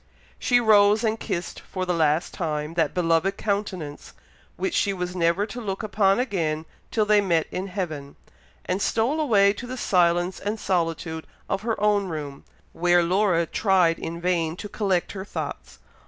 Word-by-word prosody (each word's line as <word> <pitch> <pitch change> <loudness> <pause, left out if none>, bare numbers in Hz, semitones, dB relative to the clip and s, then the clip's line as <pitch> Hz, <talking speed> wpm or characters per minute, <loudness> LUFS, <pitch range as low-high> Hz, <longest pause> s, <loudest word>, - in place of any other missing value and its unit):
She 245 - +3
rose 210 -1 +5
and 220 0 0
kissed, 185 -4 -4
for 185 -1 -5
the 180 - 0
last 160 -1 +1
time, 155 -2 -3
that 165 -3 0
beloved 175 +3 +1
countenance, 200 -8 -3 0.4
which 380 -3 -2
she 200 -10 +1
was 180 -1 -4
never 170 +3 +2
to 245 +3 -7
look 195 -1 -4
upon 200 -1 +2
again 165 -10 -1 0.2
till 215 -2 +1
they 210 0 +4
met 170 -5 +1
in 185 +2 -3
heaven, 160 -7 -5 0.5
and 185 +2 -1
stole 235 +11 +1
away 200 -9 +4
to 240 +4 -8
the 255 +1 -5
silence 175 -3 +2
and 210 +2 -3
solitude 165 -3 -2 0.2
of 195 - -1
her 225 -1 -2
own 205 -1 +2
room, 145 -5 -6 0.3
where 175 0 +3
Laura 180 -1 +2
tried 180 -3 +2
in 170 +1 -5
vain 170 -2 0
to 205 - -7
collect 195 -4 -1
her 190 -1 -6
thoughts. 205 - -6
185 Hz, 170 wpm, -25 LUFS, 170-205 Hz, 0.5 s, rose